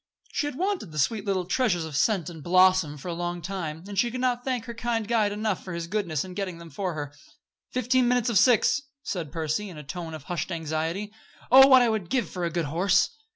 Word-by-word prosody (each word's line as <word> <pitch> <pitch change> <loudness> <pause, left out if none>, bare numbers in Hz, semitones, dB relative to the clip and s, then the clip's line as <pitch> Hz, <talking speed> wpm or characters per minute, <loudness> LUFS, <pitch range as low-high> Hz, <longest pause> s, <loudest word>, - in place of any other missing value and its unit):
She 290 - -1
had 290 - -5
wanted 370 - -2
the 155 - -8
sweet 205 +8 0
little 190 -3 0
treasures 185 -5 +1
of 155 -3 -7
scent 180 +2 +1
and 165 -3 -8
blossom 185 -3 +4
for 140 - -9
a 175 - -2
long 175 +1 -3
time, 170 -3 -5
and 200 -2 -3
she 240 - +3
could 255 +2 -5
not 245 -1 0
thank 255 -3 -2
her 235 - -6
kind 230 -2 -2
guide 220 -3 +2
enough 210 -2 -2
for 185 - -6
his 170 0 -4
goodness 170 -6 -2
in 185 - -9
getting 185 -3 -4
them 170 -1 -12
for 180 +2 -3
her. 145 -1 -5 0.6
"Fifteen 255 0 +2
minutes 245 -1 +2
of 215 -5 +4
six!" 250 +5 +4 0.2
said 175 - -4
Percy, 160 +5 -2
in 175 - -10
a 150 - -8
tone 160 +3 -6
of 155 - -10
hushed 175 +4 -4
anxiety. 165 +5 -3 0.4
"Oh! 265 +1 +10
what 260 -3 +7
would 220 -1 0
I - - -13
give 235 +2 0
for 180 - -4
a 170 - +1
good 165 -1 -1
horse." 180 +6 +2
185 Hz, 240 wpm, -26 LUFS, 165-230 Hz, 0.6 s, Oh